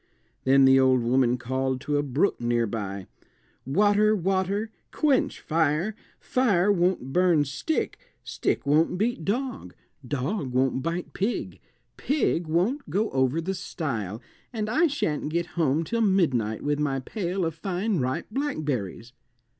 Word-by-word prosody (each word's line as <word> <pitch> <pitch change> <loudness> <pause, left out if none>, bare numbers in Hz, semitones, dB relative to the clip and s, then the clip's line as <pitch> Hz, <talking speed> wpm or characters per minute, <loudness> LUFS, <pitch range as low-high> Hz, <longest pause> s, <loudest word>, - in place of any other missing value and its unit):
Then 135 +1 +6
the 135 0 +6
old 130 -2 +4
woman 125 0 +2
called 130 +1 -2
to 145 -1 -1
a - - +2
brook 145 +6 0
near 120 0 +1
by, 100 -3 -4 0.6
"Water, 205 +7 +3
water, 195 +3 -1 0.2
quench 290 -4 +1
fire; 160 +5 0 0.2
fire 205 -7 +2
won't 175 -8 0
burn 175 -5 +3
stick, 140 - -2 0.2
stick - - -2
won't 155 +5 +2
beat 215 -4 -1
dog, 235 - -3 0.3
dog 135 - -3
won't 130 +1 +1
bite 170 +4 -3
pig, 210 +6 -2 0.4
pig 255 - 0
won't 190 - 0
go 215 +3 0
over 130 +3 +1
the 185 +4 -2
stile, 120 - -4 0.3
and 215 -3 -3
I 330 +7 +4
shan't 155 - -2
get 170 +2 -1
home 160 -2 +1
till 230 +8 -1
midnight 140 - +1
with 145 0 0
my 140 -2 0
pail 180 - -3
of 165 - -2
fine 185 +3 -2
ripe 130 0 -1
blackberries." 140 - -3
160 Hz, 140 wpm, -26 LUFS, 130-200 Hz, 0.6 s, Then